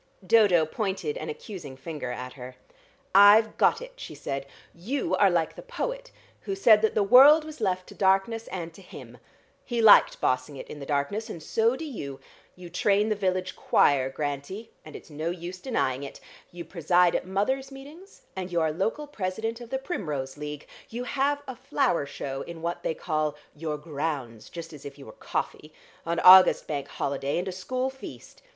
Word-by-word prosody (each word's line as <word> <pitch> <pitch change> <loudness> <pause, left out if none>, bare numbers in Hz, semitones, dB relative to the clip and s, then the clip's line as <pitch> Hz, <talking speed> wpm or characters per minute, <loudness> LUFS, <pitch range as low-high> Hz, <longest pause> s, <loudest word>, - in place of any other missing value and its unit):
Dodo 185 -6 +5
pointed 205 - -3
an - - -5
accusing 185 - -8
finger 150 -2 -6
at 125 +1 -6
her. 125 -1 -10 0.6
"I've 205 +3 +7
got 475 - +3
it," - - -11
she - - -9
said. 135 0 -5 0.3
"You 230 +12 -3
are 200 - +5
like 170 -3 0
the - - -9
poet - - -5 0.3
who 390 - -4
said 225 - +6
that 220 - +1
the 210 - +3
world 275 +9 +7
was 310 -5 -10
left 185 -3 0
to - - -11
darkness 195 +4 +1
and 170 -3 -6
to 195 - -14
him. 180 - -12 0.4
He 240 -1 -3
liked 220 -2 +7
bossing 130 +2 -1
it - - -8
in 150 - -8
the 140 - -8
darkness, 155 +11 -2
and 165 -7 -8
so 225 +8 +1
do 320 - -6
you. 140 - -7 0.4
You 180 -1 -11
train 200 +4 +1
the 215 - +1
village 185 -2 -1
choir, 135 -2 +3
Grantie, 145 +10 -5
and 155 - -12
it's - - -11
no 155 +3 -3
use 175 +1 -6
denying 140 - -1
it. 140 - -8 0.3
You 175 -1 -8
preside 175 +1 +2
at - - -2
mother's 265 +8 -1
meetings, 295 +9 -13
and 185 -1 -5
you 170 - +1
are 160 -1 +1
local 220 - -2
president 225 -2 -4
of 235 - -10
the 265 - -1
Primrose 150 - -4
League. 150 0 -7 0.2
You 240 +2 -5
have 285 +3 0
a 260 - -6
flower 255 - 0
show 135 -1 -5
in 165 -1 -9
what 170 +1 -3
they 160 - -2
call 155 -3 -2 0.2
your 150 0 -4
grounds, 145 -7 -5
just 165 -1 -8
as 145 - -11
if 140 0 -9
you 140 - -12
were 110 - -10
coffee, 150 +6 -5 0.4
on 170 0 0
August 185 0 +8
bank 145 -2 -4
holiday, 140 0 -2
and 180 +2 -2
a - - -2
school 255 +8 -3
feast. 265 - -12
185 Hz, 190 wpm, -27 LUFS, 150-230 Hz, 0.6 s, August